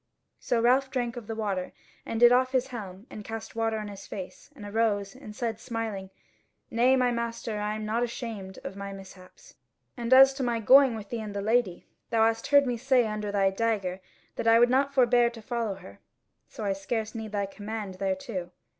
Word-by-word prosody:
So 240 - 0
Ralph 255 +3 +3
drank 245 -2 -2
of 235 -4 -8
the 225 - -4
water, 200 -4 -3 0.3
and 225 - -2
did 240 0 +8
off 255 +1 +3
his 260 0 +1
helm, 200 -5 -8
and 210 - -8
cast 225 +1 -7
water 225 -1 0
on 210 -1 -5
his 200 -1 -9
face, 190 -3 -8
and 215 -7 -10
arose, 205 -2 0
and 215 -6 -11
said 225 -2 -3
smiling: 225 -5 -4 0.6
"Nay, 245 +3 +4
my 250 -1 +2
master, 230 -2 -3
I 210 +1 -2
am 215 0 -5
nought 220 +2 0
ashamed 225 -5 -5
of 190 - -6
my 200 0 -6
mishaps: 190 -1 -14 0.4
and 240 -1 -4
as 270 +1 +8
to 270 - -6
my 240 -2 0
going 260 +2 +6
with 210 -2 -8
thee 235 -2 -3
and 210 -2 -7
the 200 - -2
Lady, 220 -4 +1 0.2
thou 225 -1 +3
hast 225 0 0
heard 285 -1 +5
me 245 -2 -1
say 255 0 +3
under 210 -1 -3
thy 195 -1 +2
dagger 195 -3 -1 0.4
that - - -2
I 225 0 +7
would 240 +1 +5
not 275 +2 +2
forbear 245 -3 +4
to 235 -1 -11
follow 225 -2 -3
her; 100 - -13 0.5
so - - -8
I 195 - +1
scarce 215 +3 -3
need 220 -2 -6
thy 200 -1 -1
command 205 -1 -6
thereto." 190 -1 -3
225 Hz, 210 wpm, -28 LUFS, 200-240 Hz, 0.6 s, did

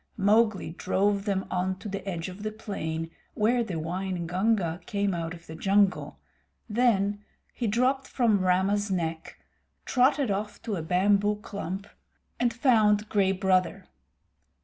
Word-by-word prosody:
Mowgli 210 -2 +2
drove 195 +3 0
them 195 -2 -1
on 185 +1 -1
to 210 - -8
the 195 -1 -4
edge 170 -2 -4
of 185 +2 -9
the 215 0 -3
plain 165 -7 -4 0.2
where 235 +3 +2
the 195 -6 -5
Waingunga 180 +2 -1
came 200 -3 0
out 165 -1 -3
of 170 0 -15
the 160 - -9
jungle; 195 +3 +1 0.5
then 210 -3 +1 0.3
he 240 - -2
dropped 255 +5 +1
from 225 -5 +2
Rama's 190 +3 +1
neck, 165 -3 -3 0.5
trotted 260 -1 +2
off 205 +1 -3
to 215 - -2
a 170 - -3
bamboo 200 +5 +2
clump, 195 -1 -5 0.5
and 245 -1 +2
found 215 -4 +3
Gray 195 -2 +2
Brother. 185 -2 +1
200 Hz, 140 wpm, -27 LUFS, 185-215 Hz, 0.5 s, found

